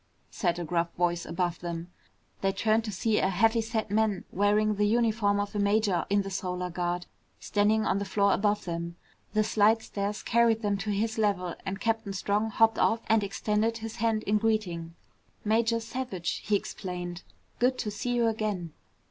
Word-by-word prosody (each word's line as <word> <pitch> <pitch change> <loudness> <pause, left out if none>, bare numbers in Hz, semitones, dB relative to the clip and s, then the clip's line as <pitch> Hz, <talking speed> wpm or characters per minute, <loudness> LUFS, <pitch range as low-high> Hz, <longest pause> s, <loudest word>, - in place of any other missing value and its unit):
said 175 -3 0
a 175 - -3
gruff 170 +1 0
voice 175 -1 0
above 175 0 -1
them. 170 0 -5 0.5
They 195 - +2
turned 220 +3 +1
to 215 - -3
see 210 +3 +1
a 190 - +2
heavy 225 +5 +3
set 220 -2 -3
man 210 -2 +1
wearing 210 +2 +2
the 210 0 +1
uniform 220 -2 +2
of 205 +1 -2
a 210 - -2
major 200 -2 +2
in 200 0 +2
the 195 - -6
Solar 180 -1 -3
Guard, 175 0 -2 0.3
standing 215 +1 +2
on 195 - +1
the 200 - -3
floor 200 0 +2
above 205 +1 +1
them. 170 -1 -4 0.4
The 215 0 +3
slidestairs 210 -1 +1
carried 230 -1 +3
them 205 -1 +1
to 205 +2 -3
his 220 +2 -1
level 185 -5 +1
and 195 0 -3
Captain 225 -2 -1
Strong 205 +3 0
hopped 225 0 +3
off 225 0 +3
and 220 -1 +4
extended 210 +3 0
his 225 -1 -7
hand 225 -1 +1
in 210 +1 +2
greeting. 180 -7 -1 0.5
"Major 230 +2 +2
Savage!" 225 -7 -3
he 210 - 0
explained. 180 -3 -4 0.4
"Good 255 +1 +2
to 210 - -2
see 210 +4 -4
you 240 -1 +3
again!" 210 -7 -1
205 Hz, 180 wpm, -28 LUFS, 185-220 Hz, 0.5 s, and